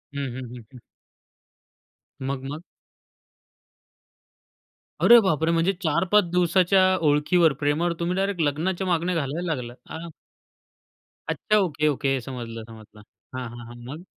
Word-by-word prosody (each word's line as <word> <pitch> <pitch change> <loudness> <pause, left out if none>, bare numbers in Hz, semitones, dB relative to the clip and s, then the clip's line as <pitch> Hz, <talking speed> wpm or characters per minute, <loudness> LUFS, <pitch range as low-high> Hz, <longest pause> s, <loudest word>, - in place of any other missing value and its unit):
हं, 140 - -2
हं, 130 -1 -6
हं, 120 - -10
हं. 125 - -12 1.4
मग-मग? 135 +3 -4 2.4
अरे 240 0 +8
बापरे! 165 -4 +1
म्हणजे 170 +3 +2
4-5 185 +6 +3
दिवसाच्या 180 +2 +3 0.3
ओळखीवर, 150 +2 +3
प्रेमावर 150 +4 +1
तुम्ही 175 +1 -1
डायरेक्ट 195 -2 -1
लग्नाच्या 170 +6 -1
मागण्या 175 0 0
घालायला 160 +3 -2
लागलात 125 -1 -10
आं. 165 +1 -7 1.2
अच्छा, 215 - +1
ओके, 155 -6 +1
ओके. 135 -1 0
समजलं, 115 -3 -6
समजलं 110 -2 -14 0.3
हां, 130 - -4
हां, 120 0 -10
हां. 120 - -11 0.2
मग? 160 +5 -9
155 Hz, 120 wpm, -24 LUFS, 135-180 Hz, 2.4 s, अरे